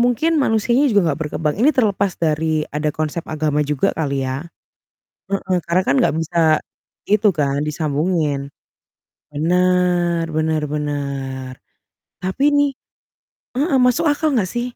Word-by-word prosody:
mungkin 290 +7 +2
manusianya 240 +3 +2
juga 200 -8 +3
nggak 150 - -7
berkembang. 150 0 -1
Ini 290 +5 +5
terlepas 200 -5 +1
dari 155 -1 0
ada 150 +1 -1
konsep 155 +2 -2
agama 150 -1 0
juga 150 -2 +1
kali 140 -4 -2
ya. 130 +3 -3 0.9
Heeh, 190 -2 0
karena 175 +2 +2
kan 135 - +3
nggak - - +2
bisa 165 +1 -3 0.7
itu 210 0 +4
kan 145 -2 0
disambungin. 150 -2 -1 0.8
Benar, 175 +1 +1
benar 155 0 0
benar. 140 -3 -4 0.7
Tapi 190 +10 -2
nih 285 -1 +2 0.8
heeh, 280 0 +2
masuk 250 +6 +3
akal 290 0 0
nggak 190 -6 0
sih? 240 - -2
165 Hz, 130 wpm, -20 LUFS, 150-210 Hz, 0.9 s, Ini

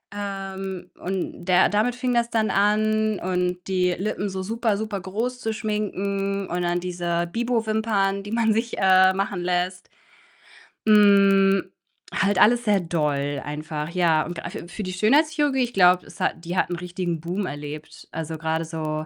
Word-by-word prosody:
Ähm, 195 -2 -5
und 185 -1 -4
der 185 0 +5
damit 215 +4 +1
fing 250 0 -1
das 235 -1 +1
dann 220 -2 +1
an 215 +1 +2
und 180 0 -1
die 185 -1 +1
Lippen 200 +2 -2
so 190 0 -4
super, 225 0 0
super 215 -2 -4
groß 225 +7 -3
zu 225 - -1
schminken 200 -2 -2
und 180 +1 -2
dann 175 0 0
diese 175 -1 -2
Bibo-Wimpern, 220 -3 0
die 205 - -8
man 225 -1 +2
sich, 230 +2 -2
äh, 185 0 +5
machen 195 -1 -2
lässt. 180 +1 -2 1.0
Hm, 195 -2 +5 0.4
halt 195 0 +1
alles 240 +4 +5
sehr 205 -2 +3
doll 145 -5 -1
einfach, 150 +1 -5
ja, 170 -3 +2
und 175 0 -7
a - - -3
für - - -7
für 190 +4 -6
die 185 -1 -4
Schönheitschirurgie, 285 - +2
ich 240 0 -4
glaube, 180 -1 +5
es - - -14
hat 165 - -2
die 175 - -4
hat - - +2
'n 175 - -2
richtigen 175 -2 -3
Boom 185 +4 -3
erlebt. 150 +2 -8
Also 160 0 -5
grade 160 +1 -1
so, 155 -1 -4
190 Hz, 165 wpm, -24 LUFS, 175-215 Hz, 1.0 s, der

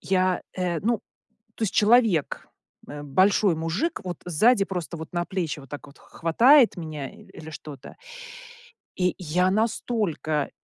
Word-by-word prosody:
Я, 185 -1 +1
э 175 -3 -2
ну, 230 +2 +1 0.6
то 225 - -3
есть 195 - -1
человек, 215 - +3 0.4
э, 145 0 -7
большой 185 +5 +3
мужик, 165 - -2
вот 180 -3 -5
сзади 195 +5 +3
просто 175 -3 -5
вот 160 0 -9
на 175 0 -1
плечи 170 -6 -3
вот 135 - -14
так 145 +1 -8
вот 140 - -17
х - - -18
хватает 235 - +5
меня 155 -4 -6
и - - -16
или 160 0 -12
что-то 150 -2 -10 1.0
и 180 -2 +1
я 180 +2 +1
настолько 210 - -1
180 Hz, 150 wpm, -25 LUFS, 155-205 Hz, 1.0 s, хватает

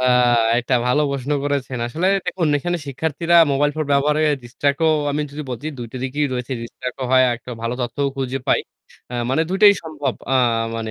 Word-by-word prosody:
আ - - -2 0.6
একটা 125 +1 0
ভালো 125 +5 +3
প্রশ্ন 140 0 -4
করেছেন। 140 -3 -2
আসলে 160 +10 -1 0.2
দেখুন 170 -4 0
এখানে 175 +4 -2
শিক্ষার্থীরা 160 +5 0 0.2
মোবাইল 145 +2 +2
ফোন 155 - -1
ব্যবহারের 150 +2 +2
ডিসট্র্যাক্ট 140 +5 -1
ও - - +5 0.2
আমি 145 +1 -1
যদি 150 +1 -5
বলছি 125 +4 -5
২ 120 - -5
টো - - -6
দিকেই 145 +3 -1
রয়েছে 125 +1 -3
ডিস্ট্রাক্ট 125 +2 -7
ও - - -1
হয় 130 0 +6
একটা 120 +2 -12
ভালো 115 +1 -2
তথ্যও 125 +4 -1
খুঁজে 135 0 -2
পাই। - - +4 0.5
অ্যা 125 - -5
মানে 155 +5 +2
২ 190 - -1
টাই 205 -1 +10
সম্ভব 145 -6 -3 0.2
আ - - +4 0.4
মানে 110 -1 -4
140 Hz, 200 wpm, -20 LUFS, 125-150 Hz, 0.6 s, টাই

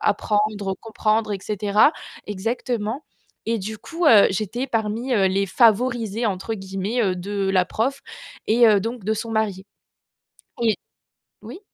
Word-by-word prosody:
apprendre, 205 -1 0
comprendre 215 -1 0
et 200 - -2
cetera. 210 - +3 0.4
Exactement 225 +4 -3 0.4
et 230 0 0
du 215 +2 -5
coup, 335 0 -3
heu, 215 -7 +7
j'étais 215 +7 -3
parmi, 225 +2 -1
heu 195 -4 +3
les 195 +1 +1
favorisés, 230 0 +2
entre 200 +2 -2
guillemets, 195 +4 -2
heu, 185 -3 0
de 195 +1 -2
la 185 -2 +3
prof 260 +9 -1 0.5
et 230 +1 +5
heu 210 -2 +5
donc 230 +2 -5
de 220 +2 +1
son 225 +1 -5
mari. 205 -3 -1 0.9
Oui. 230 -2 +3 0.7
Oui? - - -9
215 Hz, 145 wpm, -22 LUFS, 200-230 Hz, 0.9 s, heu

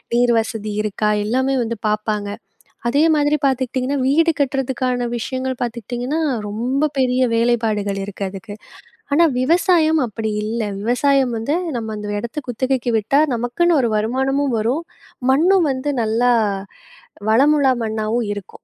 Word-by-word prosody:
நீர் 240 0 +3
வசதி 220 -1 -5
இருக்கா? 210 0 0 0.2
எல்லாமே 260 +3 +1
வந்து 230 -1 -4
பார்ப்பாங்க. 210 -1 -1 0.6
அதே 280 +5 +2
மாதிரி 295 0 +2
பார்த்துக்கிட்டீங்கன்னா, 260 +1 0
வீடு 325 +5 +3
கட்டுறதுக்கான 255 -2 -1
விஷயங்கள் 260 +2 -3
பார்த்துக்கிட்டீங்கன்னா, 245 +5 -3 0.3
ரொம்ப 255 +8 -1
பெரிய 255 -1 +2
வேலைப்பாடுகள் 220 -4 0
இருக்கு 200 0 -6
அதுக்கு. 200 +2 -9 0.6
ஆனா, 335 +3 +5 0.2
விவசாயம் 320 +1 +3
அப்படி 220 0 -4
இல்ல, 225 +2 -2 0.2
விவசாயம் 250 +2 +2
வந்து 280 +9 -1 0.2
நம்ம 220 -1 -5
அந்த 205 0 -4
இடத்தை 235 +7 -5
குத்தகைக்கு 250 0 -1
விட்டா 245 +7 +2
நமக்குன்னு 290 +8 +1
ஒரு 235 -3 +1
வருமானமும் 265 +4 0
வரும். 255 +10 -1 0.5
மண்ணும் 335 +3 +4
வந்து 265 +3 -2
நல்லா 230 +3 +2 1.0
வளமுள்ள 275 +3 +4
மண்ணாவும் 220 +1 -1
இருக்கும். 205 -2 -10
245 Hz, 125 wpm, -20 LUFS, 220-275 Hz, 1.0 s, ஆனா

